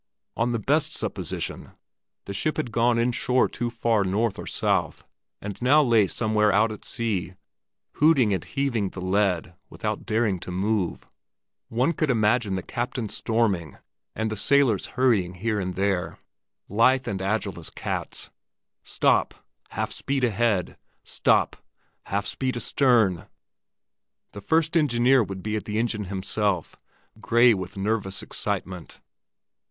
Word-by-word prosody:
On 115 Hz, +1 st, 0 dB
the 120 Hz, -, 0 dB
best 145 Hz, +8 st, +1 dB
supposition -, -, -4 dB, 0.5 s
the 100 Hz, -, -5 dB
ship 155 Hz, +10 st, -1 dB
had 150 Hz, -7 st, -2 dB
gone 115 Hz, +1 st, +2 dB
inshore 125 Hz, +1 st, +2 dB
too 120 Hz, +1 st, -3 dB
far 115 Hz, -3 st, +1 dB
north 100 Hz, +3 st, 0 dB
or -, -, -7 dB
south, -, -, -1 dB, 0.3 s
and 100 Hz, +1 st, -7 dB
now 145 Hz, +5 st, +5 dB
lay 115 Hz, -6 st, +4 dB
somewhere 105 Hz, 0 st, +1 dB
out 110 Hz, +3 st, +3 dB
at 105 Hz, -, -9 dB
sea 95 Hz, -6 st, -2 dB, 0.6 s
hooting 140 Hz, -9 st, +4 dB
and 95 Hz, -, -2 dB
heaving 125 Hz, -8 st, -1 dB
the 95 Hz, -, -9 dB
lead, 95 Hz, -2 st, 0 dB, 0.2 s
without -, -, -4 dB
daring 110 Hz, -4 st, +1 dB
to -, -, -8 dB
move. 95 Hz, +1 st, -1 dB, 0.6 s
One 125 Hz, +8 st, +1 dB
could 155 Hz, -2 st, -1 dB
imagine 110 Hz, -3 st, +2 dB
the 95 Hz, -, -3 dB
captain 120 Hz, -2 st, -3 dB
storming 100 Hz, -, -1 dB, 0.4 s
and 110 Hz, 0 st, -2 dB
the -, -, -2 dB
sailors 130 Hz, -3 st, +2 dB
hurrying 105 Hz, -9 st, +2 dB
here 105 Hz, +3 st, -1 dB
and 90 Hz, -2 st, -3 dB
there, 95 Hz, -2 st, -1 dB, 0.5 s
lithe 125 Hz, +5 st, +3 dB
and 95 Hz, -1 st, -3 dB
agile 100 Hz, -1 st, -1 dB
as 80 Hz, -, -6 dB
cats. -, -, -5 dB, 0.5 s
Stop!—Half -, -, -1 dB
speed 135 Hz, -1 st, -2 dB
ahead! 115 Hz, -5 st, +1 dB, 0.3 s
Stop!—Half 100 Hz, +1 st, -1 dB
speed 130 Hz, -2 st, -2 dB
astern! 115 Hz, -, +2 dB, 1.0 s
The 100 Hz, -, -9 dB
first 160 Hz, -, +1 dB
engineer 130 Hz, -4 st, +4 dB
would 95 Hz, -2 st, -7 dB
be 105 Hz, 0 st, -2 dB
at 110 Hz, -, -3 dB
the 105 Hz, 0 st, -3 dB
engine 110 Hz, -2 st, -1 dB
himself, 95 Hz, -1 st, -2 dB, 0.4 s
gray 120 Hz, +2 st, +5 dB
with 95 Hz, -1 st, -5 dB
nervous 100 Hz, 0 st, -2 dB
excitement. 95 Hz, -6 st, -5 dB
110 Hz, 135 wpm, -25 LUFS, 95-120 Hz, 1.0 s, now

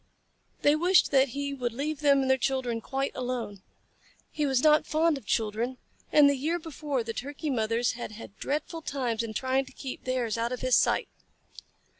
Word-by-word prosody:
They 290 Hz, +1 st, +5 dB
wished 355 Hz, +4 st, +4 dB
that 270 Hz, -1 st, +5 dB
he 280 Hz, +3 st, -3 dB
would 245 Hz, -4 st, -3 dB
leave 290 Hz, +4 st, -3 dB
them 280 Hz, -2 st, +4 dB
and 265 Hz, -, -1 dB
their 265 Hz, -, +3 dB
children 250 Hz, -3 st, -1 dB
quite 270 Hz, +2 st, -2 dB
alone. 245 Hz, -6 st, -4 dB, 0.7 s
He 300 Hz, -2 st, -1 dB
was 265 Hz, -2 st, +1 dB
not 305 Hz, 0 st, +5 dB
fond 320 Hz, +1 st, +2 dB
of 270 Hz, -8 st, -10 dB
children, 230 Hz, +3 st, -1 dB, 0.3 s
and 295 Hz, -1 st, +7 dB
the 280 Hz, -, +4 dB
year 310 Hz, +6 st, -1 dB
before 300 Hz, -5 st, -3 dB
the 230 Hz, 0 st, -4 dB
Turkey 285 Hz, +4 st, -4 dB
mothers 230 Hz, 0 st, +1 dB
had 235 Hz, -2 st, -7 dB
had 210 Hz, -2 st, -11 dB
dreadful 310 Hz, +3 st, -3 dB
times 250 Hz, -7 st, -2 dB
in 225 Hz, -2 st, -5 dB
trying 265 Hz, +2 st, +1 dB
to -, -, -14 dB
keep 265 Hz, -2 st, -7 dB
theirs 245 Hz, -4 st, -1 dB
out 235 Hz, +1 st, -1 dB
of 250 Hz, -, -4 dB
his 255 Hz, -1 st, +3 dB
sight. -, -, +2 dB
265 Hz, 190 wpm, -28 LUFS, 235-290 Hz, 0.7 s, and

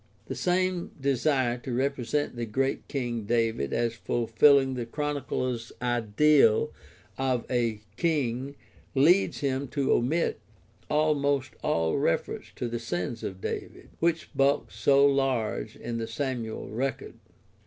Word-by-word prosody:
The -, -, -5 dB
same 180 Hz, +6 st, 0 dB
desire 130 Hz, -2 st, +1 dB
to 130 Hz, -, -6 dB
represent 135 Hz, +2 st, -1 dB
the 120 Hz, -1 st, -3 dB
great 135 Hz, +5 st, -1 dB
King 120 Hz, -5 st, -3 dB
David 115 Hz, -, 0 dB
as 115 Hz, -1 st, 0 dB
fulfilling 130 Hz, +4 st, +3 dB
the 120 Hz, -2 st, -4 dB
Chronicler's 130 Hz, -4 st, -2 dB
ideal 120 Hz, +2 st, +3 dB, 0.5 s
of 130 Hz, -3 st, 0 dB
a 115 Hz, -4 st, 0 dB, 0.2 s
king 140 Hz, -5 st, 0 dB, 0.4 s
leads 170 Hz, +9 st, +4 dB
him 135 Hz, 0 st, -1 dB
to 140 Hz, +1 st, 0 dB
omit 150 Hz, +8 st, +1 dB, 0.5 s
almost 145 Hz, -3 st, +1 dB
all 80 Hz, -1 st, +1 dB
reference -, -, -1 dB
to 125 Hz, -, -3 dB
the 120 Hz, 0 st, -3 dB
sins 115 Hz, +1 st, -3 dB
of 95 Hz, -1 st, -6 dB
David, -, -, -5 dB
which 165 Hz, -1 st, 0 dB
bulk 140 Hz, +1 st, +2 dB
so 140 Hz, 0 st, +4 dB
large 135 Hz, -, 0 dB
in 115 Hz, -1 st, -5 dB
the 115 Hz, -, -3 dB
Samuel 120 Hz, -3 st, -3 dB
record. 130 Hz, +5 st, -3 dB
130 Hz, 125 wpm, -28 LUFS, 115-140 Hz, 0.5 s, leads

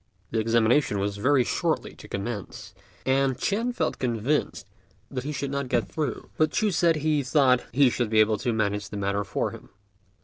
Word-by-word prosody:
The 115 Hz, -, 0 dB
examination 115 Hz, +2 st, +2 dB
was 100 Hz, +1 st, -2 dB
very 130 Hz, +5 st, +3 dB
shortly -, -, -1 dB
to -, -, -12 dB
commence, 100 Hz, 0 st, -6 dB, 0.3 s
and 135 Hz, -1 st, +2 dB
Ch'ên 220 Hz, -, 0 dB
felt -, -, -1 dB
convinced 125 Hz, +4 st, -1 dB, 0.5 s
that 130 Hz, -1 st, -4 dB
he 150 Hz, -, -2 dB
should 140 Hz, -1 st, -3 dB
not 140 Hz, -1 st, -2 dB
get 120 Hz, -3 st, +1 dB
through; 150 Hz, -7 st, -4 dB
but 155 Hz, 0 st, +3 dB
Ch'u 215 Hz, -1 st, +1 dB
said 170 Hz, -1 st, +3 dB
he 155 Hz, -1 st, +1 dB
thought 130 Hz, -2 st, +3 dB
he 135 Hz, 0 st, +4 dB
should 120 Hz, -2 st, -1 dB
be 110 Hz, 0 st, +3 dB
able 110 Hz, 0 st, +3 dB
to 125 Hz, -, 0 dB
manage 105 Hz, -2 st, -1 dB
the 105 Hz, -, -6 dB
matter 100 Hz, 0 st, -1 dB
for 95 Hz, -, -2 dB
him. -, -, -12 dB
125 Hz, 190 wpm, -26 LUFS, 110-145 Hz, 0.5 s, he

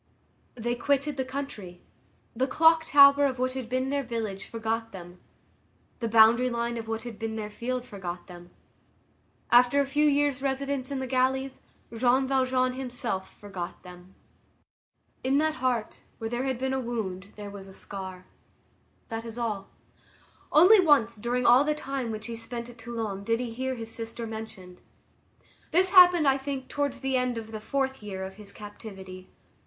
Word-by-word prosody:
They 240 Hz, 0 st, -2 dB
quitted 280 Hz, +3 st, 0 dB
the 265 Hz, -, -1 dB
country. 255 Hz, -10 st, -6 dB, 0.6 s
The 260 Hz, +3 st, +1 dB
clock 320 Hz, +3 st, +4 dB
tower 280 Hz, 0 st, +7 dB
of 260 Hz, -1 st, -3 dB
what 255 Hz, +1 st, 0 dB
had 260 Hz, -3 st, -5 dB
been 255 Hz, +1 st, -1 dB
their 285 Hz, 0 st, +1 dB
village 225 Hz, -6 st, -4 dB
forgot 225 Hz, 0 st, -3 dB
them; 175 Hz, -1 st, -11 dB, 0.8 s
the 230 Hz, -, -1 dB
boundary 230 Hz, +3 st, +6 dB
line 235 Hz, 0 st, -2 dB
of 225 Hz, -1 st, -6 dB
what 225 Hz, 0 st, -3 dB
had 235 Hz, -3 st, -8 dB
been 225 Hz, -1 st, -3 dB
their 210 Hz, -1 st, -5 dB
field 250 Hz, +3 st, -3 dB
forgot 180 Hz, -6 st, -7 dB
them; 175 Hz, -1 st, -12 dB, 1.0 s
after 245 Hz, +3 st, +6 dB
a 280 Hz, -, +3 dB
few 295 Hz, +2 st, +2 dB
years' 285 Hz, -2 st, +2 dB
residence 275 Hz, -1 st, -1 dB
in 280 Hz, -, -3 dB
the 265 Hz, -, -3 dB
galleys, 260 Hz, +1 st, 0 dB, 0.3 s
Jean 255 Hz, +3 st, +3 dB
Valjean 255 Hz, -1 st, +1 dB
himself 245 Hz, -7 st, -5 dB
forgot 190 Hz, -4 st, -7 dB
them. 180 Hz, +1 st, -13 dB, 1.1 s
In 265 Hz, +2 st, +2 dB
that 310 Hz, +1 st, +2 dB
heart, 245 Hz, -4 st, -1 dB, 0.2 s
where 225 Hz, 0 st, -5 dB
there 245 Hz, +2 st, -1 dB
had 260 Hz, -2 st, -1 dB
been 265 Hz, +1 st, -1 dB
a 265 Hz, -, 0 dB
wound, 205 Hz, -6 st, -4 dB
there 205 Hz, -1 st, -8 dB
was 195 Hz, -1 st, -9 dB
a -, -, -12 dB
scar. 190 Hz, -2 st, -8 dB, 0.8 s
That 225 Hz, -1 st, -4 dB
is 230 Hz, 0 st, -8 dB
all. 215 Hz, -5 st, -3 dB, 0.8 s
Only 370 Hz, +8 st, +8 dB
once, 275 Hz, -10 st, +4 dB
during 240 Hz, +3 st, -1 dB
all 245 Hz, +3 st, +7 dB
the 300 Hz, +1 st, 0 dB
time 270 Hz, -4 st, -4 dB
which 215 Hz, -1 st, -5 dB
he 235 Hz, -, -5 dB
spent 235 Hz, +1 st, -7 dB
at 235 Hz, -, -18 dB
Toulon, 225 Hz, -4 st, -4 dB
did 230 Hz, +2 st, 0 dB
he 240 Hz, -2 st, -4 dB
hear 260 Hz, +2 st, -2 dB
his 225 Hz, -1 st, -7 dB
sister 230 Hz, 0 st, -6 dB
mentioned. 220 Hz, -5 st, -8 dB, 0.9 s
This 365 Hz, +2 st, +3 dB
happened, 355 Hz, -5 st, +8 dB
I 270 Hz, 0 st, +3 dB
think, 270 Hz, -1 st, -5 dB
towards 285 Hz, -2 st, -2 dB
the 265 Hz, -1 st, +1 dB
end 250 Hz, -1 st, 0 dB
of 220 Hz, -1 st, -7 dB
the 215 Hz, -1 st, -6 dB
fourth 265 Hz, +2 st, -2 dB
year 195 Hz, -2 st, -5 dB
of 190 Hz, +1 st, -8 dB
his 205 Hz, -2 st, -12 dB
captivity. 195 Hz, -3 st, -10 dB
240 Hz, 175 wpm, -27 LUFS, 215-265 Hz, 1.1 s, Only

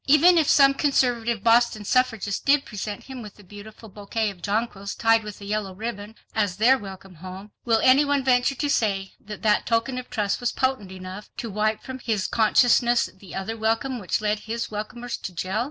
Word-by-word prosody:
Even 330 Hz, +5 st, +6 dB
if 310 Hz, -, +1 dB
some 275 Hz, -1 st, +6 dB
conservative 240 Hz, -6 st, +1 dB
Boston 230 Hz, -2 st, +3 dB
suffragists 225 Hz, -5 st, 0 dB
did 285 Hz, 0 st, +3 dB
present 210 Hz, -1 st, -6 dB
him 260 Hz, -2 st, -9 dB
with 210 Hz, -3 st, -11 dB
a 205 Hz, -, -16 dB
beautiful 205 Hz, +3 st, -12 dB
bouquet 210 Hz, +1 st, -3 dB
of 180 Hz, -3 st, -16 dB
jonquils 205 Hz, -1 st, -2 dB
tied 225 Hz, -1 st, +3 dB
with 210 Hz, -1 st, -8 dB
a 200 Hz, -, -10 dB
yellow 205 Hz, -2 st, -3 dB
ribbon, 220 Hz, 0 st, -6 dB, 0.2 s
as 205 Hz, -4 st, 0 dB
their 240 Hz, +5 st, +5 dB
welcome 195 Hz, -4 st, -9 dB
home, 185 Hz, +4 st, -10 dB
will 230 Hz, -2 st, +3 dB
any 260 Hz, +3 st, +6 dB
one 285 Hz, -1 st, 0 dB
venture 255 Hz, +1 st, +2 dB
to 290 Hz, -, -2 dB
say 200 Hz, -8 st, 0 dB
that 210 Hz, +1 st, -10 dB
that 210 Hz, -1 st, +2 dB
token 235 Hz, +2 st, 0 dB
of 250 Hz, -, -10 dB
trust 205 Hz, -3 st, -1 dB
was 245 Hz, -, -1 dB
potent 260 Hz, -8 st, -1 dB
enough 185 Hz, +2 st, -9 dB
to 230 Hz, -, -5 dB
wipe 215 Hz, +1 st, -1 dB
from 260 Hz, -1 st, -7 dB
his 220 Hz, -6 st, -1 dB
consciousness 240 Hz, +2 st, +3 dB
the 190 Hz, -3 st, -11 dB
other 195 Hz, +4 st, -4 dB
welcome 225 Hz, +4 st, -1 dB
which 195 Hz, +1 st, -2 dB
led 210 Hz, 0 st, 0 dB
his 230 Hz, +2 st, -5 dB
welcomers 225 Hz, +3 st, -5 dB
to 180 Hz, -, -8 dB
jail? 185 Hz, +5 st, -2 dB
220 Hz, 200 wpm, -24 LUFS, 205-245 Hz, 0.2 s, Even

